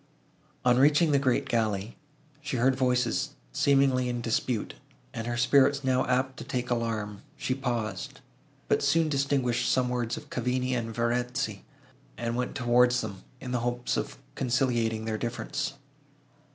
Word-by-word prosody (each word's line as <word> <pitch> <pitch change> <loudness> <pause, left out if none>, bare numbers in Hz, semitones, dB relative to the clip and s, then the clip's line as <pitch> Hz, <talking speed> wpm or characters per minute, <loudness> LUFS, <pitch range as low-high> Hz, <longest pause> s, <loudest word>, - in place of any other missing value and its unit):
On 125 0 +5
reaching 150 +3 +5
the 140 - +4
great 130 -3 +1
gallery, 110 -2 -1 0.5
she 145 -3 -3
heard 130 +2 +3
voices 125 -2 +1 0.2
seemingly 135 -3 +3
in 120 0 -2
dispute, 115 -1 -1 0.4
and, 115 0 -4
her 120 0 -2
spirits 140 +3 +4
now 130 -1 +2
apt 130 +1 0
to - - -6
take 125 -2 -3
alarm, 110 -4 -2 0.2
she 130 - -1
paused, 120 -7 -3 0.5
but - - +2
soon 165 -1 +3
distinguished 135 -4 +1
some 125 -1 +2
words 120 -2 -1
of - - -11
Cavigni 125 +1 -1
and 115 -2 -2
Verezzi, 120 +2 -1 0.5
and 115 +1 -2
went 125 +1 -2
towards 125 0 +3
them, 100 -3 -7 0.2
in 125 - -6
the 125 - +1
hope 120 +1 -1
of - - -3 0.2
conciliating 120 -4 0
their 110 -1 -2
difference. 140 +4 -3
125 Hz, 150 wpm, -28 LUFS, 115-130 Hz, 0.5 s, On